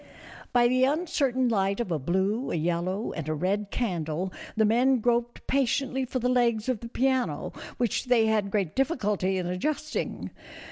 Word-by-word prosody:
By 240 -1 +5
the 255 +1 +2
uncertain 275 -4 +1
light 200 -3 +1
of 235 -7 -2
a 160 - 0
blue, 190 - 0
a - - -1
yellow, 175 +6 -1
and 155 -3 -5
a 155 - 0
red 195 +6 -1
candle 180 -5 -2 0.2
the 220 - +4
men 250 +5 +4
groped 240 +1 0
patiently 265 0 0
for 255 - -3
the 250 0 0
legs 235 -3 +2
of 255 -4 0
the 235 - -8
piano, 260 0 0 0.2
which 240 0 0
they 245 -3 +4
had 215 -2 +1
great 195 -5 -1
difficulty 210 - 0
in 180 - -2
adjusting. 295 - -3
230 Hz, 170 wpm, -27 LUFS, 190-255 Hz, 0.2 s, By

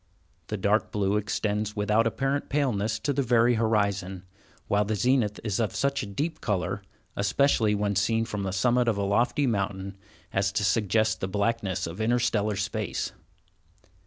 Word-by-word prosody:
The 105 - -3
dark 100 +3 +1
blue 100 -1 0
extends 105 0 -1
without 105 +2 +2
apparent 135 +5 -1
paleness 110 -7 0
to 145 - -1
the 140 - +1
very 120 -1 +3
horizon, 100 -5 0 0.4
while 105 0 +2
the 110 +1 -1
zenith 115 -1 +1
is 105 -2 -1
of 105 -4 -1
such 140 +5 0
a - - -5
deep 155 +11 -3
color, 95 -5 -1 0.3
especially 105 +1 +2
when 100 0 0
seen 115 +3 +1
from 105 -3 -4
the 95 -1 -2
summit 120 +6 +2
of 110 -3 +2
a 100 - 0
lofty 120 +8 +1
mountain, 100 -4 -2 0.4
as 95 0 +1
to 105 - 0
suggest 105 0 +1
the 95 - -1
blackness 100 -2 -1
of 85 +6 -6
interstellar 110 -2 +1
space. 105 0 -2
105 Hz, 160 wpm, -27 LUFS, 100-115 Hz, 0.4 s, very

